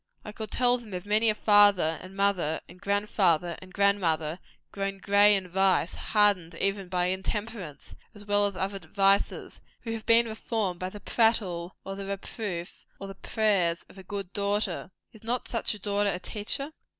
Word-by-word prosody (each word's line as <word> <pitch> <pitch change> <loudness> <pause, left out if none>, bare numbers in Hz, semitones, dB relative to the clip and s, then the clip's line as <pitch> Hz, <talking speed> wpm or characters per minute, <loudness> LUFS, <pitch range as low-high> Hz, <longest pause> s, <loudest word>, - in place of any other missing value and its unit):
I 210 - -6
could 215 0 -7
tell 245 +2 +2
them 215 -5 -9
of 180 - -6
many 215 +2 +3
a 215 - +1
father 205 -7 +4
and 185 +1 -11
mother, 195 -6 +1
and 180 +2 -16
grand 205 +1 0
father 175 -4 +2
and 185 0 -13
grand 200 +1 +2
mother, 160 0 -1 0.3
grown 195 0 -3
grey 205 +1 +5
in 190 -2 -3
vice 190 -1 +2
hardened 200 -6 +2
even 195 +1 -1
by 180 -1 0
intemperance 190 - -4 0.2
as 205 0 -10
well 205 0 +2
as 200 - -6
other 195 +2 -2
vices 195 +4 +1 0.2
who 225 -2 -4
have 225 -1 -7
been 230 0 +6
reformed 220 -4 -2
by 185 - -3
the 210 - -10
prattle, 190 -7 0
or 195 - -5
the 195 0 -6
reproof, 195 -2 -5 0.2
or 195 - -7
the 195 - -7
prayers 195 -5 0
of 195 - -14
a - - -10
good 195 -1 -6
daughter. 200 -2 -1 0.2
Is 220 -1 -16
not 240 +2 -2
such 230 -2 -1
a - - -11
daughter 205 +1 0
a 180 - -1
teacher? 250 +10 -3
200 Hz, 185 wpm, -28 LUFS, 185-210 Hz, 0.3 s, been